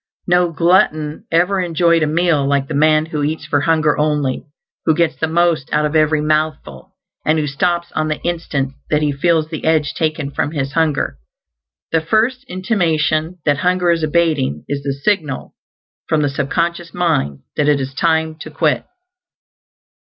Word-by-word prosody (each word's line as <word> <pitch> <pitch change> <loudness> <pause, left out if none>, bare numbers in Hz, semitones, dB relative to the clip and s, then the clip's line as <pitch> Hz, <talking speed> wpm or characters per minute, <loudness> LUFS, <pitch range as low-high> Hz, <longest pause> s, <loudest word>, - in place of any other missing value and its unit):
No 175 -1 +2
glutton 160 -2 +1
ever 180 +4 +2
enjoyed 170 -1 +2
a 155 - +2
meal 160 -2 +2
like 140 0 0
the 155 - -5
man 155 +1 +3
who 155 -2 -4
eats 150 +1 -2
for 145 -1 0
hunger 155 -2 +2
only, 150 -3 0 0.4
who 160 - +4
gets 170 -1 +1
the 160 - -1
most 165 -3 +1
out 150 0 +2
of 150 +1 -2
every 155 0 +3
mouthful, 155 - -2 0.3
and 155 +1 +2
who 155 - 0
stops 170 +4 -1
on 155 0 -1
the 155 -1 -2
instant 150 -6 -2 0.2
that 150 0 +1
he 150 - +1
feels 155 +2 +1
the 160 -2 -6
edge 155 -2 +1
taken 155 -3 -2
from 145 +2 -2
his 135 -3 -2
hunger. 160 -2 0 0.7
The 165 - +2
first 230 +10 +1
intimation 170 - 0
that 145 -1 +2
hunger 180 -1 +2
is 165 -1 +1
abating 155 - 0
is 145 -1 -3
the 140 -1 -2
signal 150 -2 -2 0.6
from 155 -1 +2
the 145 - +1
sub 140 0 -3
conscious 170 0 -2
mind 150 - 0
that 150 0 +2
it 145 -1 +3
is 135 0 -4
time 160 +1 +1
to - - -8
quit. - - 0
155 Hz, 175 wpm, -18 LUFS, 145-170 Hz, 0.7 s, who